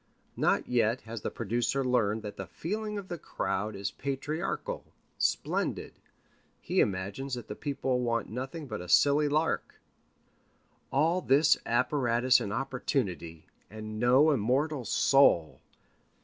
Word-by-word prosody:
Not -, -, +1 dB
yet 120 Hz, 0 st, +1 dB
has 115 Hz, -1 st, -7 dB
the -, -, -2 dB
producer 120 Hz, +4 st, -1 dB
learned 110 Hz, -4 st, +1 dB
that 105 Hz, -1 st, -6 dB
the 95 Hz, -, -7 dB
feeling 210 Hz, -, -4 dB
of 200 Hz, -2 st, -6 dB
the 175 Hz, -2 st, -5 dB
crowd 105 Hz, -4 st, -3 dB
is 100 Hz, +1 st, -3 dB
patriarchal, 155 Hz, -, -3 dB, 0.4 s
splendid. -, -, -1 dB, 0.7 s
He 185 Hz, -, -1 dB
imagines 100 Hz, +8 st, -1 dB
the 115 Hz, -4 st, -7 dB
people 130 Hz, 0 st, -2 dB
want 115 Hz, -2 st, -1 dB
nothing 135 Hz, +7 st, -5 dB
but 110 Hz, -8 st, -5 dB
a 90 Hz, -, -9 dB
silly 145 Hz, -, +4 dB
lark. 155 Hz, +3 st, 0 dB, 1.2 s
All 165 Hz, +6 st, +2 dB
this 145 Hz, +1 st, +5 dB
apparatus 125 Hz, 0 st, +3 dB
and 100 Hz, -, -4 dB
opportunity, 110 Hz, -, -3 dB, 0.2 s
and 110 Hz, 0 st, -7 dB
no 130 Hz, +6 st, +5 dB
immortal 135 Hz, +3 st, 0 dB
soul! 110 Hz, -, +4 dB
125 Hz, 125 wpm, -29 LUFS, 110-145 Hz, 1.2 s, this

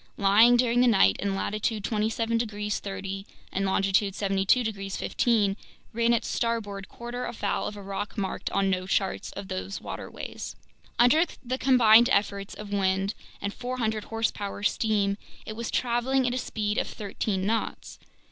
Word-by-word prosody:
lying 215 Hz, +5 st, +6 dB
during 245 Hz, 0 st, +3 dB
the 250 Hz, -, +5 dB
night 145 Hz, -, +5 dB
in 195 Hz, -1 st, -1 dB
latitude 215 Hz, +1 st, -1 dB
27 225 Hz, +2 st, 0 dB
degrees 210 Hz, -2 st, -2 dB
30' 195 Hz, 0 st, -5 dB, 0.3 s
and 195 Hz, +1 st, -1 dB
longitude 195 Hz, 0 st, +2 dB
72 195 Hz, +4 st, +2 dB
degrees 195 Hz, -3 st, -4 dB
15', 210 Hz, -5 st, +1 dB, 0.4 s
ran 235 Hz, +1 st, +2 dB
its 235 Hz, -, +1 dB
starboard 210 Hz, -5 st, -2 dB
quarter 240 Hz, +1 st, -5 dB
afoul 230 Hz, -, -2 dB
of 210 Hz, -, -6 dB
a 200 Hz, -, -8 dB
rock 200 Hz, +3 st, -5 dB
marked 195 Hz, -2 st, -2 dB
on 195 Hz, 0 st, +1 dB
no 185 Hz, -1 st, 0 dB
charts 195 Hz, 0 st, -1 dB
of 200 Hz, -1 st, -7 dB
these 190 Hz, +1 st, -4 dB
waterways. -, -, -7 dB, 0.4 s
Under 245 Hz, +7 st, +6 dB, 0.2 s
the 255 Hz, +2 st, -2 dB
combined 240 Hz, -2 st, +6 dB
efforts 200 Hz, -2 st, 0 dB
of 205 Hz, -1 st, -7 dB
wind 195 Hz, 0 st, +1 dB, 0.3 s
and 200 Hz, 0 st, -2 dB
400 230 Hz, -4 st, -2 dB
horsepower 215 Hz, -3 st, -3 dB
steam, 210 Hz, -2 st, +1 dB, 0.3 s
it 215 Hz, -, -6 dB
was 235 Hz, +1 st, -4 dB
traveling 255 Hz, +2 st, +1 dB
at 245 Hz, -, +1 dB
a 255 Hz, -, -1 dB
speed 210 Hz, -3 st, -1 dB
of -, -, -1 dB
thirteen 200 Hz, -2 st, -3 dB
knots. 225 Hz, +2 st, -2 dB
210 Hz, 155 wpm, -27 LUFS, 195-235 Hz, 0.4 s, lying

